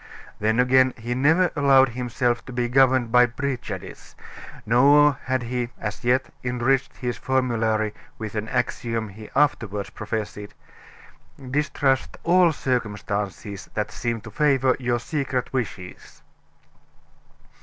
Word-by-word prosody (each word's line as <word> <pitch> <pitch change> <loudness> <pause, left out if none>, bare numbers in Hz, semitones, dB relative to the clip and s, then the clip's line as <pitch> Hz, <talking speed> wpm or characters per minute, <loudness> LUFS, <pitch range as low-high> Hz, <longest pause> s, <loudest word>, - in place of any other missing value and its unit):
Then 110 +3 +1
again, 130 +1 +4
he 120 +1 -4
never 160 +8 +3
allowed 135 -3 +5
himself 120 0 -1
to - - -9
be 120 -1 -1
governed 130 -1 +3
by 125 0 +6
prejudice, 125 -6 -6 0.5
nor 140 +4 +5
had 130 -1 0
he 120 0 -3
as 105 +2 -5
yet 125 +2 +1
enriched 125 +2 0
his 125 -2 -3
formulary 115 -5 0 0.2
with 110 -2 -6
an 110 0 -3
axiom 115 -3 -2
he 105 +2 -11
afterward 110 -8 0
professed: 105 -1 -5 1.0
"Distrust 140 -2 0
all 175 0 +5
circumstances 105 -6 -3
that 105 -1 -2
seem 115 -1 -3
to 110 - -11
favor 135 -1 +2
your 120 -2 0
secret 130 -1 -3
wishes." 105 -8 -6
125 Hz, 120 wpm, -24 LUFS, 110-130 Hz, 1.0 s, by